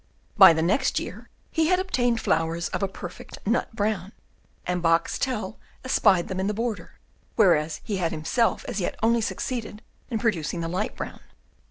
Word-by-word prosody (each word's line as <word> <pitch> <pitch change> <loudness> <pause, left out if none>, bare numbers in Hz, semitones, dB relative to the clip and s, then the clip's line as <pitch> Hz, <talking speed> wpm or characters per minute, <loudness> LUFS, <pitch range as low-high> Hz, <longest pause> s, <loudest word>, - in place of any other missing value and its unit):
By 190 -5 +9
the 160 0 0
next 200 +11 +2
year - - -8 0.2
he 320 -1 +2
had 365 +1 +4
obtained 245 -11 +1
flowers 165 -1 0
of - - -3
a 195 - +1
perfect 180 -2 -9
nut 225 +1 0
brown, 205 -2 -1 0.5
and 180 0 -1
Boxtel 190 +6 0 0.3
espied 200 -8 +3
them 190 -1 -4
in 190 - 0
the 210 - -1
border, 230 -1 -4 0.4
whereas 160 -7 +3
he 210 -4 -2
had 170 -3 0
himself 165 +9 0
as 220 -5 -3
yet - - -2
only 230 +1 +3
succeeded 220 -1 -4 0.3
in 230 - -1
producing 175 -7 -1
the 165 - -2
light 185 +6 -2
brown. - - -6
200 Hz, 170 wpm, -25 LUFS, 170-230 Hz, 0.5 s, By